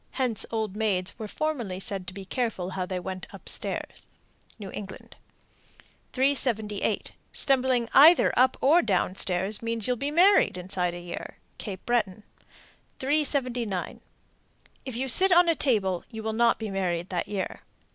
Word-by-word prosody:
(Hence 250 -5 0
old 220 -3 -3
maids 200 -4 0
were 215 - -5
formerly 240 -9 -3
said 195 -2 -2
to 190 - -6
be 195 -1 -8
careful 200 -5 -3
how 185 -1 -3
they 185 -1 -3
went 185 0 -7
up - - -13
stairs.) - - -3 0.5
New 200 -4 -8
England. 195 -2 -9 1.0
378. 245 -6 0 0.2
Stumbling 255 -3 +2
either 320 +5 +7
up 255 +1 +3
or 315 +6 +5
down 185 - 0
stairs 190 +3 0
means 230 -2 -1
you'll 250 - +3
be 280 +5 -2
married 355 - +4
inside 180 -1 -2
a - - -6
year. 175 0 -8 0.2
Cape 195 -3 -7
Breton. 215 -4 0 0.7
379. 255 -8 -1 0.8
If 260 -3 -5
you 260 +3 -2
sit 375 +10 +4
on 350 0 +6
a 335 - +4
table, 200 - 0
you 220 -2 -8
will 220 0 -2
not 235 +1 +3
be 220 -2 -5
married 180 -2 -2
that 180 -2 -2
year. 200 -2 -4
220 Hz, 155 wpm, -26 LUFS, 190-260 Hz, 1.0 s, either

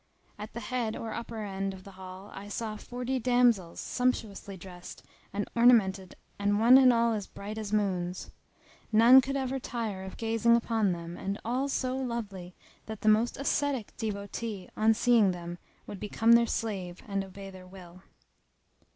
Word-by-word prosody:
[FN#286] - - -5
At - - -18
the 235 - -5
head 230 -1 -2
or 225 - -5
upper 235 0 -6
end[FN#287] 195 -2 -3
of 185 - -13
the 195 - -11
hall 190 +1 -10
I 200 +1 -8
saw 215 +1 -4
forty 250 +4 -3
damsels, 240 -7 +2
sumptuously 220 -6 -2
dressed 180 0 -11 0.3
and 205 +1 -3
ornamented 205 -6 +4 0.2
and 205 0 +1
one 245 +4 +8
and 255 -1 +7
all 230 -1 +2 0.2
bright 210 +2 -6
as 210 -2 -5
moons; 185 -4 -1 0.6
none 235 +4 +8
could 275 +1 -3
ever 265 0 -2
tire 225 -6 -4
of 190 - -8
gazing 230 +1 +3
upon 225 -4 +1
them 170 0 -6
and 195 +2 -4
all 255 +4 0
so 255 -1 -1
lovely 215 -8 -5 0.3
that 220 -1 -7
the 215 - +3
most 220 +3 +3
ascetic 275 -4 -1
devotee 205 -1 -4
on 220 +1 +3
seeing 225 -5 +4
them 175 0 -7 0.3
would 200 - -8
become 225 +3 +1
their 235 0 +6
slave 190 -7 -4
and 195 -1 -1
obey 195 0 -10
their 185 -1 -12
will. 180 -1 -13
215 Hz, 170 wpm, -29 LUFS, 190-235 Hz, 0.6 s, one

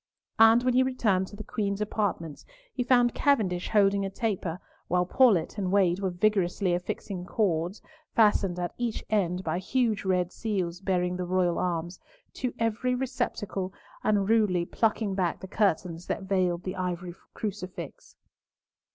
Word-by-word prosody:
And 225 +2 +7
when 255 0 +2
he 255 - +5
returned 220 -8 +1
to 205 - -11
the 215 - -7
Queen's 200 -2 -2
apartments, 205 -7 -2 0.3
he 255 - -2
found 245 -1 +4
Cavendish 210 -11 +1
holding 200 -2 +3
a 195 - -2
taper, 190 -5 -2 0.3
while 180 +1 +2
Paulett 205 -3 +3
and 185 -2 -1
Wade 190 -3 +3
were 195 -1 0
vigorously 185 -1 +1
affixing 180 +1 -4
cords, 180 -1 -1 0.3
fastened 205 -5 +3
at 175 -1 -3
each 235 -2 -2
end 185 -3 +1
by 165 +1 -1
huge 225 +1 0
red 180 -2 +1
seals 185 -6 -2
bearing 180 -2 0
the 180 - -3
royal 180 -1 +1
arms, 175 0 -2 0.3
to 250 -2 -2
every 230 +3 0
receptacle, 205 -7 -3 0.3
and 205 -2 +2
rudely 205 -6 +3
plucking 215 0 0
back 180 -3 -1
the 190 - -8
curtains 180 -4 0
that 200 - -2
veiled 185 -3 0
the 185 +1 -4
ivory 180 -1 -3 0.2
crucifix. 200 -3 -6
195 Hz, 150 wpm, -28 LUFS, 180-215 Hz, 0.3 s, And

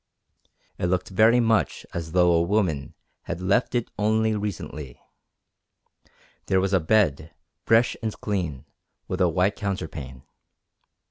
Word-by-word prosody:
It 90 - 0
looked 90 +1 -1
very 110 +5 +4
much 115 -2 +1
as 80 -1 -5
though 90 -1 +4
a 85 - +3
woman 85 -6 0 0.3
had 85 - -4
left 100 +7 +1
it 120 -1 -1
only 110 +1 +2
recently. 80 -10 -5 1.5
There 95 - +3
was 95 +1 0
a 95 - +5
bed, 80 -3 +1 0.3
fresh 115 +2 +4
and 110 - -2
clean, 85 - -3 0.4
with 95 +1 -3
a 90 - +4
white 90 +5 +1
counterpane. 80 - -5
95 Hz, 130 wpm, -25 LUFS, 85-110 Hz, 1.5 s, a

